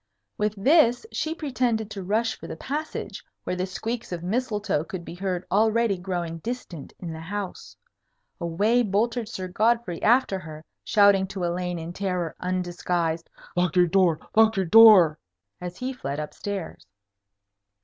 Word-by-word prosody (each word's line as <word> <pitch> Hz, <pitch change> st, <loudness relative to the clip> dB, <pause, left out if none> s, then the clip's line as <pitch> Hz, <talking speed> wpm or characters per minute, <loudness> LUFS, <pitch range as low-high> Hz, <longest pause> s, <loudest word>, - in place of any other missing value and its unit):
With 210 Hz, 0 st, -1 dB
this, 245 Hz, -, +4 dB
she 320 Hz, +1 st, -2 dB
pretended 245 Hz, -8 st, -1 dB
to 200 Hz, -, -5 dB
rush 220 Hz, +5 st, 0 dB
for -, -, -10 dB
the -, -, -6 dB
passage, 295 Hz, -, -5 dB, 0.2 s
where -, -, -2 dB
the 180 Hz, +1 st, -2 dB
squeaks 225 Hz, +5 st, -5 dB
of 175 Hz, -1 st, -4 dB
Mistletoe 210 Hz, -5 st, -1 dB
could 180 Hz, -2 st, -7 dB
be -, -, -8 dB
heard 180 Hz, 0 st, -3 dB
already 220 Hz, +1 st, +3 dB
growing 175 Hz, -3 st, -4 dB
distant 190 Hz, -, -6 dB
in 170 Hz, -3 st, -6 dB
the 160 Hz, -, -7 dB
house. 195 Hz, +3 st, -6 dB, 0.6 s
Away 205 Hz, +9 st, +2 dB
bolted 225 Hz, +2 st, 0 dB
Sir 185 Hz, -5 st, -5 dB
Godfrey 215 Hz, -1 st, 0 dB
after 230 Hz, -4 st, +3 dB
her, 155 Hz, -3 st, -10 dB, 0.2 s
shouting 200 Hz, -2 st, +4 dB
to 190 Hz, -1 st, -5 dB
Elaine 175 Hz, 0 st, -2 dB
in 165 Hz, +1 st, -6 dB
terror 180 Hz, -4 st, -2 dB
undisguised, 175 Hz, -2 st, -2 dB, 0.3 s
"Lock 180 Hz, -1 st, +1 dB
your 180 Hz, -1 st, +6 dB
door! 175 Hz, -2 st, +3 dB, 0.2 s
Lock 220 Hz, 0 st, +5 dB
your 190 Hz, -, +1 dB
door!" 190 Hz, -6 st, +8 dB, 0.4 s
as 180 Hz, 0 st, -6 dB
he 255 Hz, +1 st, -3 dB
fled 145 Hz, -, -5 dB
up 150 Hz, -, -5 dB
stairs. 195 Hz, -, -6 dB
190 Hz, 155 wpm, -25 LUFS, 175-225 Hz, 0.6 s, door